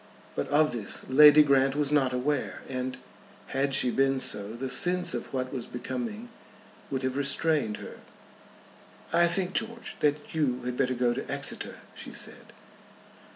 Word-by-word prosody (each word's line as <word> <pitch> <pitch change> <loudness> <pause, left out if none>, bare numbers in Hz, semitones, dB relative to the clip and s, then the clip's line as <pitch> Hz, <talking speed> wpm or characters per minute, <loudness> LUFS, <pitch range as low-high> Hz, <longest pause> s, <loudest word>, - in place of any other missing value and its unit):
But - - -2
of 150 +1 +3
this 115 -4 -4
Lady 150 +2 +8
Grant 135 -1 +3
was 145 -1 0
not 135 -3 +3
aware, 135 +3 -2
and, 130 0 -4 0.5
had 135 0 0
she 125 -2 +3
been 135 +1 +2
so, 105 -3 -3
the 130 +3 -4
sense 180 +6 +1
of - - -5
what 130 -1 -3
was 125 -3 -4
becoming 225 - -5 0.6
would 135 -1 -3
have 130 0 -1
restrained 140 -4 +1
her. - - -10 1.1
"I 170 +1 +5
think, 180 +2 0
George, 235 +1 -3
that 150 0 0
you 130 -6 0
had 125 0 -3
better 130 -1 0
go 120 -1 +1
to - - -5
Exeter," - - -3
she - - -8
said. - - -3
135 Hz, 155 wpm, -28 LUFS, 125-150 Hz, 1.1 s, Lady